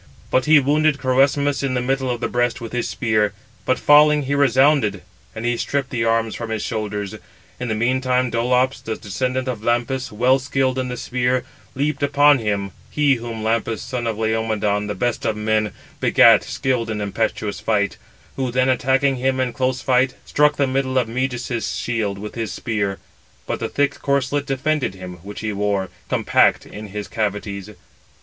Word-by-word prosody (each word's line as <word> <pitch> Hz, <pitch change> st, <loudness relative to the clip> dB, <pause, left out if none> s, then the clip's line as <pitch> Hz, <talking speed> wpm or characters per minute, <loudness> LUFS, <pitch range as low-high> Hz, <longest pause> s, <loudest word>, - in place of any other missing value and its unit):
But 130 Hz, -, +2 dB
he 155 Hz, 0 st, +7 dB
wounded 150 Hz, +2 st, +2 dB
Crœsmus 140 Hz, +1 st, +2 dB
in 135 Hz, -2 st, -1 dB
the -, -, +1 dB
middle 130 Hz, +1 st, -1 dB
of 120 Hz, -1 st, -2 dB
the -, -, 0 dB
breast 120 Hz, 0 st, 0 dB
with 115 Hz, -2 st, -7 dB
his 120 Hz, -1 st, -1 dB
spear, 110 Hz, -3 st, +1 dB, 0.3 s
but 130 Hz, -, +2 dB
falling, 150 Hz, 0 st, +5 dB
he 140 Hz, +1 st, -2 dB
resounded; 135 Hz, -7 st, +3 dB, 0.3 s
and 110 Hz, -, -5 dB
he 120 Hz, 0 st, +1 dB
stripped 140 Hz, 0 st, -2 dB
the 120 Hz, -3 st, -1 dB
arms 115 Hz, -1 st, +1 dB
from 115 Hz, -1 st, -5 dB
his 110 Hz, -2 st, -2 dB
shoulders. 105 Hz, -3 st, -3 dB, 0.5 s
In 125 Hz, -, -3 dB
the 110 Hz, -, -1 dB
meantime 125 Hz, +2 st, +1 dB
Dolops, 125 Hz, +3 st, +1 dB
the 110 Hz, -, -4 dB
descendant 130 Hz, +6 st, -3 dB
of 120 Hz, -5 st, -3 dB
Lampus, 120 Hz, +3 st, 0 dB
well 125 Hz, +5 st, +3 dB
skilled 130 Hz, -1 st, 0 dB
in 130 Hz, -, -2 dB
the 125 Hz, 0 st, -5 dB
spear, 125 Hz, +1 st, 0 dB, 0.3 s
leaped 145 Hz, +1 st, -1 dB
upon 145 Hz, 0 st, +5 dB
him 100 Hz, -3 st, -2 dB, 0.2 s
(he 145 Hz, -2 st, +3 dB
whom 115 Hz, -2 st, -6 dB
Lampus, 115 Hz, 0 st, 0 dB
son 125 Hz, -2 st, -3 dB
of 110 Hz, -2 st, -2 dB
Laomedon, 110 Hz, -2 st, 0 dB
the 105 Hz, -, -3 dB
best 120 Hz, +5 st, -1 dB
of 105 Hz, -, -1 dB
men, 110 Hz, 0 st, 0 dB, 0.3 s
begat, -, -, +6 dB
skilled 125 Hz, -4 st, -1 dB
in 110 Hz, -1 st, -2 dB
impetuous 105 Hz, -1 st, -2 dB
fight), 100 Hz, -2 st, 0 dB, 0.4 s
who 130 Hz, -2 st, -1 dB
then 130 Hz, +2 st, +1 dB
attacking 130 Hz, +1 st, +2 dB
him 130 Hz, +1 st, 0 dB
in 125 Hz, -2 st, 0 dB
close 130 Hz, -2 st, -1 dB
fight, 130 Hz, 0 st, +2 dB
struck 150 Hz, 0 st, +3 dB
the 140 Hz, -, +2 dB
middle 130 Hz, 0 st, -1 dB
of 125 Hz, -3 st, +2 dB
Meges's 125 Hz, -1 st, -2 dB
shield 110 Hz, -5 st, -2 dB
with 105 Hz, +1 st, -7 dB
his 115 Hz, -3 st, -4 dB
spear: 100 Hz, -4 st, -2 dB, 0.5 s
but -, -, -3 dB
the -, -, -3 dB
thick 145 Hz, 0 st, 0 dB
corslet 140 Hz, +1 st, 0 dB
defended 135 Hz, -5 st, -1 dB
him, 90 Hz, -1 st, -8 dB
which 100 Hz, +4 st, -9 dB
he 110 Hz, -1 st, -2 dB
wore, 100 Hz, -2 st, -1 dB, 0.2 s
compact -, -, +3 dB
in 105 Hz, 0 st, -9 dB
its 105 Hz, +1 st, -6 dB
cavities. 105 Hz, -2 st, -3 dB
125 Hz, 180 wpm, -21 LUFS, 110-130 Hz, 0.5 s, he